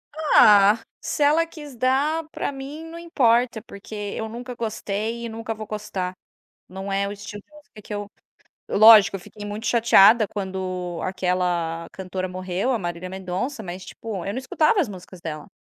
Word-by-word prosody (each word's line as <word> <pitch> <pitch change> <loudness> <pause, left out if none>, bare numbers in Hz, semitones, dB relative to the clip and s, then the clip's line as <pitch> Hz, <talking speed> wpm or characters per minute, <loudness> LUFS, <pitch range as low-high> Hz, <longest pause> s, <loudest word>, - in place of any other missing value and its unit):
Ah, 210 -9 +6 0.2
se 295 - -1
ela 315 +3 +4
quis 295 -5 -11
dar, 280 +6 +1
pra - - -3
mim 280 +4 -8
não 330 +1 -9
importa, 240 -8 +2
porque 220 -1 -12 0.2
eu 220 - -4
nunca 245 +2 -7
gostei 225 0 -3
e - - -4
nunca 225 0 -5
vou 215 -1 -8
gostar. 200 -4 -4 0.5
Não 190 +2 -6
é 200 0 0
o 200 - -4
estilo 205 0 -8
de - - -40
música 290 -7 -15
que 210 - -8
eu 205 0 -4 0.6
lógico, 215 -2 +8
eu - - -4
fiquei 205 +3 -11
muito 210 +3 -5
chateada 225 -1 +6
quando 185 -3 -4
aquela 180 -3 -1
cantora 185 0 -4
morreu, 185 +6 -2
a 245 - +1
Marília 175 0 -5
Mendonça, 190 +7 -4
mas, 185 0 -7
tipo, 205 -6 -6
eu 200 - -2
não 230 - -5
escutava 305 - +2
as 310 - +2
músicas 185 -2 -10
dela. 155 -3 -7
210 Hz, 175 wpm, -23 LUFS, 185-245 Hz, 0.6 s, lógico